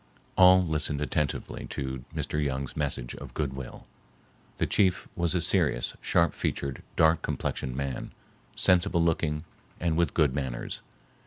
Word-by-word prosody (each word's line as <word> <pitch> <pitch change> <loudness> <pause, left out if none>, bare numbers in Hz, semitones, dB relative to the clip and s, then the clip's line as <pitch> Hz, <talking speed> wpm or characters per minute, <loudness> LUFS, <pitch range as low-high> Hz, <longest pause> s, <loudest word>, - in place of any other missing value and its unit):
All 95 0 +7
listened 75 -2 0
attentively 75 -1 -2
to 65 -2 -4
Mr. 75 0 -1
Young's 70 -1 -2
message 70 -5 -2
of - - -10
goodwill. 65 -3 -4 0.7
The - - +1
chief 95 -3 +2
was 85 0 0
a 90 - +2
serious, - - +1
sharp 85 0 +3
featured, 70 -1 -2
dark 80 0 +4
complexioned 65 -1 -2
man, 70 -2 -3 0.5
sensible 85 -2 +3
looking 80 -2 0 0.4
and 85 -2 +1
with 85 0 +1
good 75 -5 +3
manners. 65 -4 -4
75 Hz, 135 wpm, -28 LUFS, 65-85 Hz, 0.7 s, All